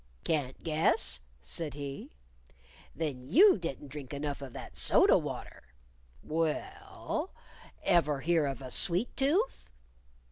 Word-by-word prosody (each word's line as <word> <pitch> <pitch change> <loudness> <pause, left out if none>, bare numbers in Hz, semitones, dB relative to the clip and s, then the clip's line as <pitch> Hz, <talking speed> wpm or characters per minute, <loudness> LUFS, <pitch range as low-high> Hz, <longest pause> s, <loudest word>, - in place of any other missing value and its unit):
"Can't 140 -5 -2
guess?" 65 - +1 0.2
said 145 - -2
he. 140 -1 -6 0.9
"Then 150 -6 -3
you 275 - +6
didn't 145 -4 -5
drink 140 -1 -7
enough 145 0 -4
of 135 -2 -7
that - - -9
soda - - +5
water. 60 0 -5 0.5
Well, 165 - -3 0.5
ever 150 -6 +3
hear 165 -2 +2
of 135 0 -5
a 130 - -7
sweet 180 - +2
tooth?" 330 - 0
150 Hz, 115 wpm, -31 LUFS, 135-170 Hz, 0.9 s, you